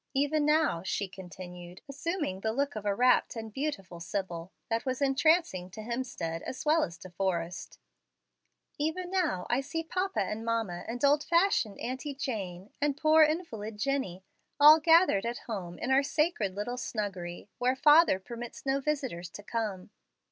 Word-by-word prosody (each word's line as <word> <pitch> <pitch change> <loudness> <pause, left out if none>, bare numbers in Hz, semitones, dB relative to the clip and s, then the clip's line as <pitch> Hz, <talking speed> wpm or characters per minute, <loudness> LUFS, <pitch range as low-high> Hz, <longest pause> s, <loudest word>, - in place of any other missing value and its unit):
Even 290 +2 +2
now," 300 - +3
she 200 +1 -2
continued, 180 -1 -10
assuming 290 - -3
the 220 +1 -1
look 280 +2 -1
of 210 -1 -4
a 200 - +1
rapt 250 +2 +3
and 220 -2 -6
beautiful 200 - -4
sibyl, 175 0 -4 0.2
that 225 0 -1
was 260 0 -2
entrancing 275 - +2
to 195 +4 -9
Hemstead 215 -9 -3
as 260 - -6
well 315 +2 +4
as 170 - -5
De 185 -2 -11
Forrest 175 -1 -3 1.0
"even 350 +4 -2
now 330 - 0
I 245 +3 +1
see 290 +4 -4
papa 370 +3 -1
and 210 +3 -3
mamma 225 -7 -2
and 245 +4 -1
old 290 +1 +4
fashioned 340 - +2
Auntie 265 +3 -4
Jane, 200 -8 -5
and 290 -1 +1
poor 310 +1 +5
invalid 300 - 0
Jennie, 265 -8 -2 0.4
all 300 +2 +9
gathered 325 - +5
at 235 +1 -2
home 185 -6 -5
in 260 - -3
our 265 +1 +6
sacred 285 - 0
little 245 +5 -3
snuggery 195 -8 -4
where 250 +1 +2
father 300 - +6
permits 235 +6 -8
no 270 0 +1
visitors 260 - -2
to 205 - -10
come." 210 -4 -3
235 Hz, 160 wpm, -30 LUFS, 190-295 Hz, 1.0 s, all